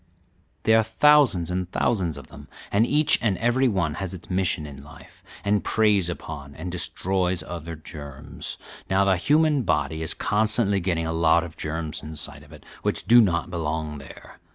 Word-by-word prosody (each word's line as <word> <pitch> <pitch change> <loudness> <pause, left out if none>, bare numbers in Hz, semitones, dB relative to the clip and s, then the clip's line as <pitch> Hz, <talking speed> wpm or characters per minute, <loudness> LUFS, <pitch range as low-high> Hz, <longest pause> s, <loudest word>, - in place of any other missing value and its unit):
There 110 +1 +5
are - - +3
thousands 110 - +4
and 90 0 -3
thousands 90 -10 0
of 70 - -11
them, - - -12 0.2
and 110 +4 +3
each 150 +2 +4
and 105 -5 +1
every 120 +3 +2
one 95 -9 0
has 95 -1 -4
its 90 - -11
mission 90 -3 0
in 70 -2 -10
life, 75 - -16 0.2
and 105 0 +2
preys 105 -5 +2
upon 70 -4 -7
and 90 +3 -6
destroys 90 0 -1
other 85 -1 -7
germs. 75 -3 -9 0.3
Now, 95 +1 +3
the 95 -1 +4
human 150 - +3
body 80 -5 -1
is 80 - -3
constantly 105 -1 +1
getting 85 -2 -1
a 80 - -2
lot 80 +1 +3
of 85 -2 -9
germs 80 0 -4
inside 75 -1 -7
of 75 0 -17
it 75 -2 -13 0.2
which - - -2
do 120 +1 +7
not 90 -4 0
belong 80 -3 -3
there. 70 - -13
90 Hz, 175 wpm, -24 LUFS, 80-105 Hz, 0.3 s, do